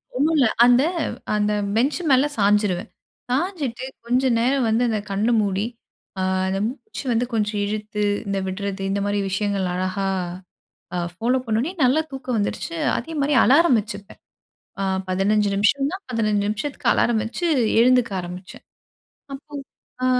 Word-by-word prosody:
ஒண்ணும் 300 +5 +2
இல்ல. 260 - +5 0.2
அந்த 245 +1 +5 0.5
அந்த 210 0 +1 0.2
பெஞ்ச் 265 +9 +1
மேல 265 +2 +5
சாஞ்சிருவேன். 205 -1 +2 0.4
சாஞ்சுட்டு, 275 -5 -2 0.2
கொஞ்ச 250 +2 +2 0.2
நேரம் 255 +2 +2
வந்து 225 +2 +2
அந்த 220 -2 0
கண்ண 200 +3 0
மூடி, 200 0 -1 0.6
ஆ - - 0 0.3
அந்த 190 +1 -1
மூச்சு 290 - -8
வந்து 235 +2 +1
கொஞ்சம் 210 -1 0
இழுத்து 210 0 -3 0.2
இந்த 200 0 -1
விடுறது, 195 +1 -4
இந்தமாரி 200 +1 0
விஷயங்கள் 200 -1 -1
அழகா 185 +2 -2 0.9
அ - - 0 0.2
ஃபாலோப் 250 +6 0
பண்ணவுனே, 230 +9 0
நல்லா 260 +5 +4
தூக்கம் 260 -3 -3
வந்துடுச்சு. 210 +10 -3 0.2
அதேமாரி 295 -3 -1
அலாரம் 280 -2 +5
வச்சிப்பேன். 205 -2 -10 0.6
ஆ. - - 0 0.3
15 205 +3 +2
நிமிஷந்தான். 280 - +1
15 215 -4 +1
நிமிஷத்துக்கு 265 +7 -3
அலாரம் 230 -2 +2
வச்சு, 230 +10 -4 0.4
எழுந்துக்க 250 -3 +4
ஆரம்பிச்சேன். 180 +1 -9 0.7
அப்போ 280 +2 -12 0.5
ஆ, - - +3
225 Hz, 135 wpm, -22 LUFS, 200-260 Hz, 0.9 s, இல்ல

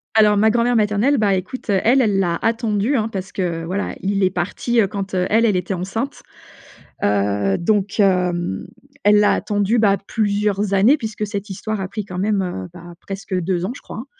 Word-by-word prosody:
Alors 210 -1 +5
ma 215 +2 +4
grand-mère 240 +2 +2
maternelle, 215 +6 +2
bah, 205 -4 +2
écoute, 190 +7 -6
heu, 195 -2 +3
elle, 260 +4 +4
elle 205 -5 +2
l'a 170 -3 0
attendu 225 +2 0
hein, 220 -4 +1
parce 195 -3 -6
que 170 -3 -2
voilà, 190 +4 -3
il 195 0 0
est 185 - +4
parti, 210 +6 0
heu, 195 - +2
quand, 195 -1 -5
heu, 180 -1 +1
elle, 225 +2 +3
elle 210 -4 +2
était 180 +2 -1
enceinte. 210 +9 -4 0.8
Heu, 100 -1 +1
donc 205 +3 0
hem, 180 - +1 0.4
elle 210 0 +5
l'a 210 - +4
attendu, 205 +3 0
bah, 200 -2 +4
plusieurs 205 -1 0
années 210 +10 +5
puisque 215 -4 -4
cette 205 0 -5
histoire 215 +2 -4
a 190 - -3
pris 210 +1 -5
quand 185 -2 -7
même, 205 0 +1
heu, 95 - -5
bah, 175 0 -11
presque 195 0 -6
2 180 0 -1
ans 200 - -2
je - - -12
crois, - - -9
hein 235 - -7
200 Hz, 205 wpm, -20 LUFS, 185-215 Hz, 0.8 s, Alors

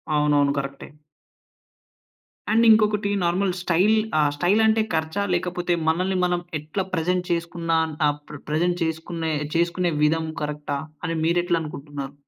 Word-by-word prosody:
అవునవును. 145 -1 +3
కరెక్టే. 140 0 -6 1.6
అండ్, 230 +2 +4
ఇంకొకటి 210 -2 +4
నార్మల్ 185 +3 +1
స్టైల్ 185 +5 +3 0.2
ఆహ్, 150 -1 +4
స్టైల్ 195 +7 +3
అంటే 220 0 +3
ఖర్చా? 160 +5 -1
లేకపోతే, 175 0 -1
మనల్ని 185 +3 +1
మనం 175 0 +1 0.2
ఎట్లా 155 +6 -3
ప్రెజెంట్ 180 +2 0
చేసుకున్న 170 0 -2 0.4
ఆహ్, 145 0 0
ప్ర 150 - -8
ప్రెజెంట్ 175 +3 0
చేసుకునే 160 0 -3 0.2
చేసుకునే 170 +1 +1
విధం 160 +2 +2 0.2
కరెక్టా? 150 -1 -3 0.3
అని 165 - -2
మీరు 170 +2 +2
ఎట్లా 175 -2 +1
అనుకుంటున్నారు? 145 -2 -7
170 Hz, 130 wpm, -23 LUFS, 150-180 Hz, 1.6 s, అండ్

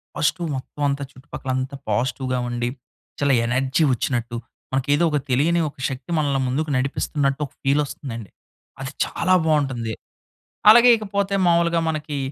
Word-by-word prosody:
Positive 170 +3 0
మొత్తం 130 +3 -9
అంతా, 140 0 -2
చుట్టుపక్కల 130 0 -7
అంతా 130 +2 -3
పాజిటివ్‌గా 125 +3 0
ఉండి 120 0 -1 0.5
చాలా 140 -1 +3
ఎనర్జీ 130 +5 +1
వచ్చినట్టు, 120 -1 -2 0.4
మనకి 135 +1 -1
ఏదో 145 - +2
ఒక 150 - +2
తెలియని 150 +7 +2
ఒక - - -20
శక్తి 135 +6 -7
మనల్ని 140 -3 +1
ముందుకు 150 +5 -1
నడిపిస్తున్నట్టు 140 +2 0
ఒక - - -28
ఫీల్ 140 +2 +3
వస్తుందండి. 115 - -7 0.5
అది 135 0 -4
చాలా 185 +2 0
బాగుంటుంది. 135 -8 0 0.8
అలాగే 240 +3 +9
ఇకపోతే 200 -2 -1
మాములుగా 170 0 +3
మనకి 155 -2 -3
140 Hz, 140 wpm, -22 LUFS, 130-155 Hz, 0.8 s, అలాగే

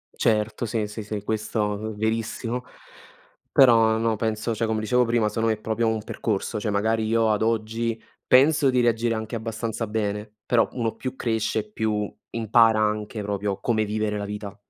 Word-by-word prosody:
Certo, 110 +1 +1
sì, 110 -1 -1
sì, 105 +1 -7
sì 105 -1 -5
questo 105 -1 -1
v 110 0 -5
verissimo. 115 +3 -2 0.9
Però 115 -5 +6
no, 115 0 +1
penso 110 +1 -1
cioè, 115 - 0
come 110 0 -1
dicevo 125 +3 +2
prima, 115 -2 +1
secondo 115 +1 0
me 110 - +2
è 105 - -18
proprio 110 +1 -1
un 110 -1 -1
percorso, 105 -1 -2
cioè 105 0 -2
magari 110 +2 +1
io 110 0 +2
ad 105 - 0
oggi 115 +1 -1 0.3
penso 140 +2 +5
di 125 -1 +3
reagire 115 0 +1
anche 110 +2 -4
abbastanza 115 0 -3
bene, 105 0 -3
però 120 -2 +3
uno 115 -3 -2
più 130 0 -5
cresce, 110 -2 -1
più 105 -1 -2 0.2
impara 115 -1 +4
anche 105 0 -1
proprio 100 -1 -2
come 110 0 +1
vivere 105 0 -1
la 100 - -3
vita. 105 0 -6
110 Hz, 175 wpm, -24 LUFS, 105-115 Hz, 0.9 s, Però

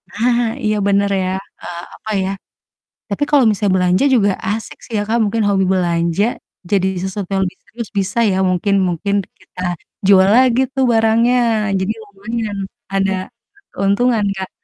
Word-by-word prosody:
Nah, 235 +1 0
iya, 215 0 +1
bener 200 0 +2
ya, 185 - -1 0.3
eee, 170 -1 -6
apa 220 - -7
ya 190 - -1 0.8
tapi 200 +7 -1
kalau 285 -4 +5
misalnya 205 -2 +1
belanja 180 +7 +2
juga 205 -4 +3 0.2
asik 220 +2 -4
sih 235 - -12
ya - - +1
Kak 230 +2 +1
mungkin 220 +1 0
hobi 200 -1 +2
belanja, 170 +1 +1 0.5
jadi 190 -2 +3 0.2
sesuatu 190 0 -4
yang 190 0 +2
lebih 180 - -6
serius 230 -1 -7
bisa 200 +4 -1
ya 185 - 0
mungkin 190 +3 +1
mungkin 190 +4 -1 0.2
kita - - -11 0.5
jual 190 -1 +6
lagi 255 -1 +4
tuh 265 -2 +1
barangnya, 225 +2 +3 0.4
jadi 190 +3 -1
lumayan 210 +1 -5 0.4
ada, 195 0 +1 0.6
keuntungan 210 +3 +1
Kak. 190 -1 -5
200 Hz, 155 wpm, -18 LUFS, 190-225 Hz, 0.8 s, jual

